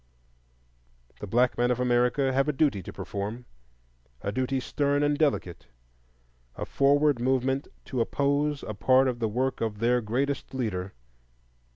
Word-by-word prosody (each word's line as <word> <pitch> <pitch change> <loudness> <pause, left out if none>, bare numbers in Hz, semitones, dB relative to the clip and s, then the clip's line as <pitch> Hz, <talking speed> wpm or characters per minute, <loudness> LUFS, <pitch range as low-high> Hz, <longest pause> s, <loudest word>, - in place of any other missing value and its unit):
The 105 - -6
black 120 +5 +2
men 120 0 +3
of 125 0 0
America 125 +2 +2
have 135 +2 +2
a - - +1
duty 135 -8 +1
to - - -8
perform, 105 +5 -5 0.8
a 100 - -1
duty 130 +4 -1
stern 145 +2 0
and 145 0 +2
delicate,—a - - -5
forward 145 -1 +3
movement 130 +2 0 0.2
to 130 -3 -2
oppose 145 +3 0
a 110 - -5
part 130 +5 +4
of 125 -2 -2
the 110 -2 0
work 130 +5 -1
of 110 -2 -2
their 120 +3 +2
greatest 135 +5 -2
leader. 95 -7 -3
125 Hz, 145 wpm, -27 LUFS, 105-135 Hz, 0.8 s, part